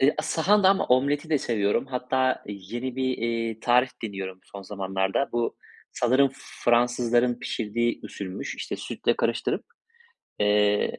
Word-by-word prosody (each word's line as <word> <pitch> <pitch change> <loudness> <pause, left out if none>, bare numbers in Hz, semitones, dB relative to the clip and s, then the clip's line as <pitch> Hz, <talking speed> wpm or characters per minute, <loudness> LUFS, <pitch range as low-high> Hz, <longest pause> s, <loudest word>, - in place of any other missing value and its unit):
Eee, 140 +3 +4
sahanda 190 +5 +3
ama 195 0 +3
omleti 140 +5 +2
de 150 - +3
seviyorum. 105 -1 0
Hatta 130 0 0
yeni 120 +6 -5
bir, 130 - 0
iii, 115 -1 -2
tarif 125 +1 +3
deniyorum 95 -3 -5
son 100 -1 -10
zamanlarda. 95 +4 -1
Bu 120 -1 -1 0.4
sanırım 130 +3 +3 0.3
Fransızların 120 0 +3
pişirdiği 120 +2 -1
usulmüş. 95 -1 -6
İşte, - - -5
sütle - - -1
karıştırıp, - - 0 0.8
eee, 105 0 +2
120 Hz, 125 wpm, -26 LUFS, 105-130 Hz, 0.8 s, Eee